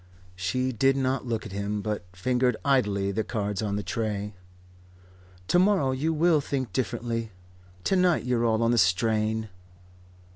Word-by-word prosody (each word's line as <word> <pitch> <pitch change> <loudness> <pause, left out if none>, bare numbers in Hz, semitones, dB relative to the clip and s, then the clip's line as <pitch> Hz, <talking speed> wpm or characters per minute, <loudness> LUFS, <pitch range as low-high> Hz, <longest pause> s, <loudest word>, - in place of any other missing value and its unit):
She 125 +9 -1
did 135 +3 +2
not 130 -1 -1
look 115 -2 -2
at 105 - -8
him, 100 +1 -3
but 105 -4 -3
fingered 125 +5 0
idly 105 -8 +2
the 110 +3 -1
cards 105 -2 -2
on 105 -2 -1
the 105 - -2
tray. 105 -3 -3 1.2
"To 175 - +4
morrow 185 -8 +3
you 140 +5 0
will 160 -1 +3
think 130 -7 -3
differently. 115 -1 -2 0.5
To 195 - +1
night 180 -7 +2
you're 125 -2 +1
all 115 0 +2
on 115 - +3
the 120 - +3
strain." 110 +3 +1
115 Hz, 155 wpm, -27 LUFS, 105-130 Hz, 1.2 s, To